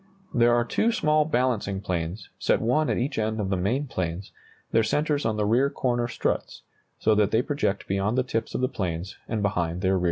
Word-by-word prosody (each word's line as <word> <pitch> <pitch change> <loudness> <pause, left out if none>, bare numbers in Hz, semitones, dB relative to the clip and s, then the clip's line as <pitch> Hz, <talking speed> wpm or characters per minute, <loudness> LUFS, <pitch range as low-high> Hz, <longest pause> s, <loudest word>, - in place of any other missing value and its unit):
There 120 0 +4
are 120 0 +2
two 225 - +1
small 155 -7 +2
balancing 120 -8 0
planes, 90 +1 -4
set - - +2
one 150 +7 +1
at - - +1
each 135 +1 -1
end 110 0 -1
of 100 -2 -1
the 95 - +1
main 110 +11 0
planes, 95 -6 -4 0.4
their 115 - +4
centres 145 +4 +1
on 110 -1 -1
the 105 - +1
rear 125 +6 +3
corner 120 -3 0
struts, - - -2 0.3
so 110 - +3
that 105 -1 +3
they 110 +3 +2
project 140 -9 -1
beyond 100 +5 0
the 130 - +3
tips 115 -3 -3
of - - -1
the 130 - +3
planes 90 -7 -4
and 110 -2 -2
behind 90 -3 -1
their 95 -1 +2
rear 95 - +3
lines. - - 0
110 Hz, 220 wpm, -26 LUFS, 95-130 Hz, 0.4 s, There